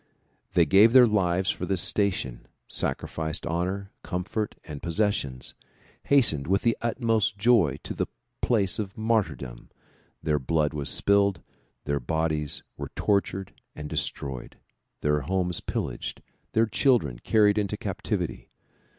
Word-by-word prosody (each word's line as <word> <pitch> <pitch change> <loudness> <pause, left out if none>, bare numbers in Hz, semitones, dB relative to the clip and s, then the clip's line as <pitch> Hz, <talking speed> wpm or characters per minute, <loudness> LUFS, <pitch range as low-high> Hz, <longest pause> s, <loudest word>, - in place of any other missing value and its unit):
They 85 - +5
gave 100 +8 +6
their 130 -2 +9
lives 95 -4 +1
for 90 - -5
this 95 -2 +1
station, 95 - 0 0.2
sacrificed 80 -1 -2
honor, 90 +4 -2
comfort 100 +3 -3
and 75 -3 -8
possessions, 85 -8 -1 0.5
hastened 115 - +3
with 95 +2 +1
the 115 -1 +3
utmost 115 -4 0
joy 100 - +3
to - - -5
the - - -2 0.3
place 100 -7 +1
of 100 -2 -5
martyr 110 -8 +1
dom; - - -10 0.5
their 75 -1 +1
blood 75 +3 0
was 75 -2 -1
spilled, 100 -3 +3 0.4
their 70 0 0
bodies 75 +2 -1 0.2
M^ere - - -4
tortured 95 -1 0 0.2
and 75 0 -6
destroyed, 65 -3 -4 0.4
their 75 0 +1
homes 90 +2 -1
pillaged, - - -4 0.3
their 110 +1 +4
children 110 - +2
carried 105 - +3
into 100 -2 -2
captivity. - - -3
95 Hz, 130 wpm, -26 LUFS, 75-105 Hz, 0.5 s, their